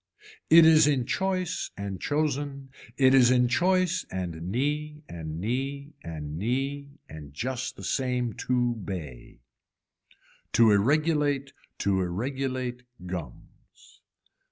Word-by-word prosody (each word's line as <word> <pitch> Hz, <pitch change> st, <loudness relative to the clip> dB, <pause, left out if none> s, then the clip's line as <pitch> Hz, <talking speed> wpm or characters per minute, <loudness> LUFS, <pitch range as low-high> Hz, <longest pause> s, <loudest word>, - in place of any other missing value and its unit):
It 165 Hz, 0 st, +9 dB
is 155 Hz, -2 st, +7 dB
in 135 Hz, -5 st, +1 dB
choice 185 Hz, +3 st, -1 dB
and 100 Hz, -2 st, -5 dB
chosen, 145 Hz, -2 st, -2 dB, 0.3 s
it 130 Hz, -1 st, +5 dB
is 125 Hz, -3 st, +6 dB
in 125 Hz, -1 st, +4 dB
choice 185 Hz, +6 st, +2 dB
and 85 Hz, -2 st, -5 dB
knee 150 Hz, +5 st, -2 dB
and 80 Hz, -1 st, -6 dB
knee 135 Hz, -, -3 dB
and 75 Hz, -2 st, -6 dB
knee 140 Hz, +6 st, -2 dB
and 75 Hz, -2 st, -11 dB
just 130 Hz, -, -3 dB
the 95 Hz, -, -11 dB
same 125 Hz, +2 st, -1 dB
two 120 Hz, +1 st, 0 dB
bay. 80 Hz, -, -8 dB, 1.1 s
To 115 Hz, -2 st, +6 dB
irregulate 145 Hz, +4 st, +2 dB, 0.3 s
to 95 Hz, -2 st, +2 dB
irregulate 125 Hz, +6 st, -3 dB, 0.2 s
gums. 90 Hz, -8 st, -10 dB
130 Hz, 110 wpm, -27 LUFS, 95-145 Hz, 1.1 s, It